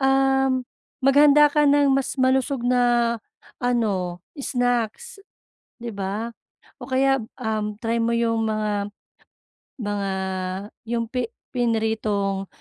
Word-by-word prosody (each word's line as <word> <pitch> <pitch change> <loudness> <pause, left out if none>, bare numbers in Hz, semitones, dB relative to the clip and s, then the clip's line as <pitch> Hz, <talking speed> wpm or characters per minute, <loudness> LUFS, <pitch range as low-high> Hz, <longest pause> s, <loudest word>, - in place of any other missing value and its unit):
um, 270 -1 +3 0.4
maghanda 290 +2 +7
ka 300 0 +3
ng 285 0 +4
mas 270 +1 -1
malusog 260 +1 +2
na 240 -1 +3 0.4
ano 205 -8 0 0.2
snacks, 245 - -1 0.6
'di 235 - -5
ba. 200 +4 -3 0.5
O - - -6
kaya, 270 +1 +3 0.2
um, 215 -1 -2
try 230 0 -1
mo 230 +1 +1
'yung 230 -1 +1
mga 210 -1 -1 0.9
mga 205 -2 -2 0.8
'yung 230 -1 0
pi 250 -1 -1 0.3
pinritong, 220 -4 0
235 Hz, 105 wpm, -23 LUFS, 215-265 Hz, 0.9 s, maghanda